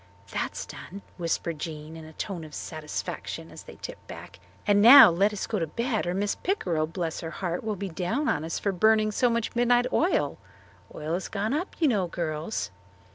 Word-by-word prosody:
"That's - - -3
done," 195 +3 -10
whispered 170 -2 -2
Jean 155 0 -6
in 160 -1 -9
a 160 - -12
tone 180 0 -5
of 155 -1 -10
satisfaction 155 -2 -5
as - - -10
they - - -12
tiptoed - - -9
back. - - -10 0.3
"And 205 -1 +4
now 250 -1 +11
let 195 +5 +2
us 210 - -3
go 215 - -2
to 165 - -1
bed 230 - -1
or 175 - -1
Mrs. 200 +1 0
Pickrell, 175 - 0
bless 165 -2 -3
her 165 - -5
heart, 175 +1 -3
will 215 -1 -2
be 195 0 -4
down 190 - -1
on 150 - +1
us 165 0 -3
for 200 - 0
burning 215 +3 +3
so 245 +4 +2
much 230 0 -1
midnight 245 0 +4
oil. 350 +4 +1 0.6
Oil 155 +2 -4
has 180 +2 -2
gone 215 +4 -2
up, 335 +6 -2
you 320 - +4
know, 205 -8 +1
girls." 155 - -3
190 Hz, 200 wpm, -27 LUFS, 165-220 Hz, 0.6 s, now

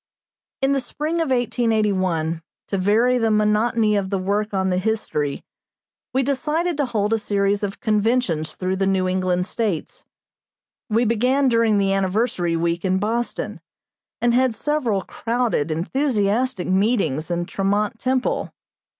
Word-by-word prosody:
In 270 - +3
the 280 - +2
spring 300 +6 -3
of 325 -3 0
1881, 205 -10 0 0.3
to 195 - 0
vary 230 +6 +3
the 225 -1 +2
monotony 215 +1 +2
of 195 -2 -1
the 195 - 0
work 205 +3 -1
on 190 -1 0
the 180 - +1
history, 185 -9 -2 0.7
we 265 +1 +1
decided 310 +6 0
to 285 -3 0
hold 215 -2 0
a 225 - +2
series 200 -1 0
of 200 -1 -4
conventions 210 -8 0
through 185 0 -2
the 195 0 +1
New 190 -1 +1
England 185 -1 0
States. 205 -6 -3 0.9
We 225 +3 +2
began 250 +5 +2
during 230 -3 +3
the 195 -1 +2
Anniversary 190 -3 0
week 170 +1 -1
in 190 -1 +1
Boston, 230 +4 -2 0.6
and 240 0 +2
had 255 -1 +2
several 235 -6 0
crowded, 230 -10 -1
enthusiastic 220 - 0
meetings 185 - +1
in 175 0 -1
Tremont 205 +4 -1
Temple. 260 0 -1
210 Hz, 140 wpm, -22 LUFS, 190-240 Hz, 0.9 s, In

